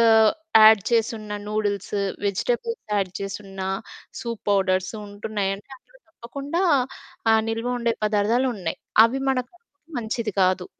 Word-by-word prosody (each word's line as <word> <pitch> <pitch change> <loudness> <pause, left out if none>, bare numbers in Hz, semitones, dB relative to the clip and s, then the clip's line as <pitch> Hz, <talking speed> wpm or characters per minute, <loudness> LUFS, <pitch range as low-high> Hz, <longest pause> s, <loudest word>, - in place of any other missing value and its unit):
ఆహ్, 220 -1 +6 0.3
add 215 -2 +8
చేసున్న 225 -2 0
noodles, 205 -1 -2 0.3
vegetables 465 - -1
add 195 -3 0
చేసున్న 195 -1 -6 0.6
soup 230 -3 -5
powders 190 -1 +1
ఉంటున్నాయి 205 -1 -3
అంటే 205 - -18
అందులో - - -24
తప్పకుండా, 280 +5 -4 0.7
ఆహ్, 220 0 +4
నిల్వ 225 +2 -2
ఉండే 235 -1 +1
పదార్థాలు 215 +5 +2
ఉన్నయి. 175 -4 -4 0.3
అవి 250 +4 0
మనకు 255 -1 -1
కడుపుకి 335 -2 -29
మంచిది 225 -1 -3
కాదు. 185 0 +2
220 Hz, 130 wpm, -24 LUFS, 200-245 Hz, 0.7 s, add